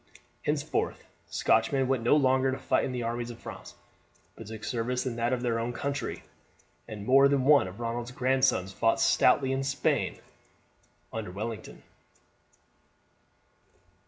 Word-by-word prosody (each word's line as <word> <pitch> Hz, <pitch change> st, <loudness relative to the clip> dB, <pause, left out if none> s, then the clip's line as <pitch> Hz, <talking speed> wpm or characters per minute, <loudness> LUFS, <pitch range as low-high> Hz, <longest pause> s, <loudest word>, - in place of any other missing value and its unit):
Henceforth -, -, -2 dB, 0.2 s
Scotchmen 135 Hz, -2 st, +2 dB
went 130 Hz, -2 st, +1 dB
no 120 Hz, +5 st, +4 dB
longer 130 Hz, -2 st, +3 dB
to 130 Hz, -, -3 dB
fight -, -, +1 dB
in 135 Hz, -, -3 dB
the 125 Hz, -1 st, -3 dB
armies 120 Hz, +1 st, -3 dB
of 120 Hz, -, -8 dB
France, -, -, -10 dB, 0.6 s
but -, -, -10 dB
took 110 Hz, 0 st, -8 dB
service 125 Hz, +2 st, -2 dB
in 125 Hz, -3 st, -2 dB
that 120 Hz, +1 st, 0 dB
of 125 Hz, -1 st, -1 dB
their 115 Hz, -2 st, 0 dB
own 120 Hz, +1 st, -2 dB
country, 140 Hz, -1 st, -4 dB, 0.6 s
and 105 Hz, -2 st, -7 dB
more 135 Hz, +3 st, +6 dB
than 140 Hz, -2 st, +1 dB
one 145 Hz, -8 st, +5 dB
of 95 Hz, +3 st, -10 dB
Ronald's 120 Hz, +1 st, -3 dB
grandsons 125 Hz, -7 st, +1 dB
fought 115 Hz, +3 st, +1 dB
stoutly 130 Hz, +1 st, +3 dB
in 135 Hz, 0 st, -1 dB
Spain 135 Hz, -, 0 dB, 1.0 s
under 110 Hz, -4 st, -4 dB
Wellington. 110 Hz, +4 st, -6 dB
120 Hz, 145 wpm, -28 LUFS, 115-130 Hz, 1.0 s, more